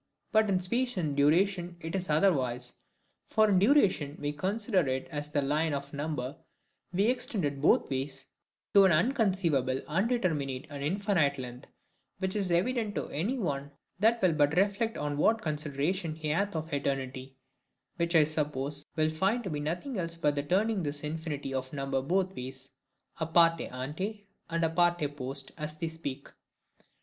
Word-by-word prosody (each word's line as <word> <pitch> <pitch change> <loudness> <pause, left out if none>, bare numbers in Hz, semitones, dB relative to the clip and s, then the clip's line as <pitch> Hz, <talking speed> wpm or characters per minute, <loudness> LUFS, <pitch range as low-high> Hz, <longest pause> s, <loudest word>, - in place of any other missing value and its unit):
But 220 -1 +4
in 190 -2 +3
space 240 +6 -1
and 155 -5 -1
duration 175 +4 +2
it 165 -1 -6
is 185 -2 -2
otherwise. 130 -7 +2 0.5
For 215 0 +4
in 195 -3 +4
duration 195 - +3
we 145 0 -2
consider 190 - 0
it 130 0 -1
as 145 -1 -3
if 150 - -18
this 145 - +2
line 150 +2 +1
of 140 0 -6
number 145 -1 -3 0.5
were 180 - -4
extended 180 - -2
BOTH - - +4
ways—to 135 +8 0
an 190 - +5
unconceivable, 170 - +2
undeterminate, 160 - 0
and 140 -1 -5
infinite 170 -4 +1
length; 125 0 -8 0.5
which 190 +1 -2
is 200 -3 0
evident 210 +4 +1
to - - -3
anyone 155 - -2 0.3
that 225 +3 +4
will 180 -3 +5
but 150 +1 +2
reflect 205 +4 +2
on 145 -1 -2
what 225 +9 +3
consideration 155 +3 -2
he 155 -1 -4
hath 200 +5 0
of 160 -1 -4
Eternity; 135 -2 -3 0.6
which, 170 0 0
I 160 - +8
suppose, 145 -2 -2
will 155 0 +2
find 195 +9 +1
to 190 - -4
be 150 - -2
nothing 180 - -3
else 165 -1 -3
but 150 -3 +1
the 145 - -1
turning 195 +7 +1
this 145 -2 -3
infinity 150 -3 -4
of 130 0 -3
number 135 -1 -1
both 190 +6 0
ways, 130 +1 -7 0.5
a 160 - -1
parte 165 0 +4
ante 185 - -5 0.2
and 170 0 +1
a - - +2
parte 175 -2 +2
post, 135 0 -4
as 150 0 -4
they 160 +1 -3
speak. 145 -4 -6
160 Hz, 165 wpm, -30 LUFS, 140-190 Hz, 0.6 s, I